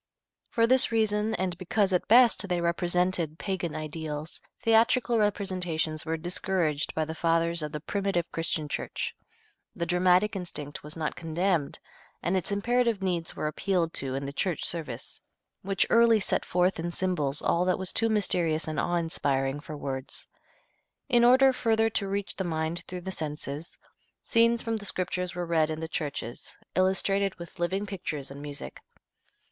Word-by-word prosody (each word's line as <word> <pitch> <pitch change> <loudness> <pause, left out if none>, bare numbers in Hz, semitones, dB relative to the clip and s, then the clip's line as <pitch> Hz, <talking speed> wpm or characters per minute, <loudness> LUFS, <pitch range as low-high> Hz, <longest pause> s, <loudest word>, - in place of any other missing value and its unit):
For 230 -3 +3
this 255 +1 +4
reason 220 -1 +1
and 185 -3 -1
because 195 +1 +1
at 180 - +1
best 230 -4 +6
they 180 -1 +1
represented 175 -1 +1
pagan 175 -5 -3
ideals, 155 0 -5 0.2
theatrical 230 +1 +4
representations 180 -7 -1
were 165 0 0
discouraged 175 -3 -1
by 155 - +1
the 160 - -5
fathers 165 +1 +1
of 150 -1 -4
the 150 - -4
primitive 195 -1 -1
Christian 165 -2 -1
Church. - - -3 0.6
The 170 - -2
dramatic 180 +3 +3
instinct 150 -6 -5
was 150 +2 -6
not 155 -2 -2
condemned, 165 -1 -1 0.5
and 175 - +1
its 185 +2 -1
imperative 230 0 +1
needs 175 -3 -2
were - - -3
appealed 165 +1 0
to 135 -1 -3
in 135 +1 -3
the 140 - -5
church 175 +2 -1
service, 145 -8 -4 0.4
which 195 0 +1
early 230 -1 +6
set 195 - 0
forth 180 0 +1
in 170 +1 -2
symbols 155 -7 +1
all 170 - +2
that 185 - +2
was 190 -1 -2
too 225 0 +2
mysterious 175 -7 +2
and 155 -1 -2
awe 175 - 0
inspiring 140 -5 0
for 150 0 -8
words. 135 -1 -5 0.8
In 240 -2 +5
order 260 +2 +6
further 225 -2 +2
to 200 -2 +2
reach 200 0 -2
the 190 - -1
mind 165 0 -2
through 180 0 -6
the 190 +2 -5
senses, 150 -1 -5 0.5
scenes 230 0 +3
from 230 -1 -1
the 205 - -8
Scriptures 180 -1 -2
were 175 0 -2
read 160 -2 +2
in 155 0 -3
the 160 - -4
churches, 145 -7 -5 0.2
illustrated 190 +1 +2
with 170 +1 -11
living 190 +4 0
pictures 160 -9 -5
and 140 +1 -8
music. 145 -1 -8
175 Hz, 165 wpm, -28 LUFS, 155-200 Hz, 0.8 s, best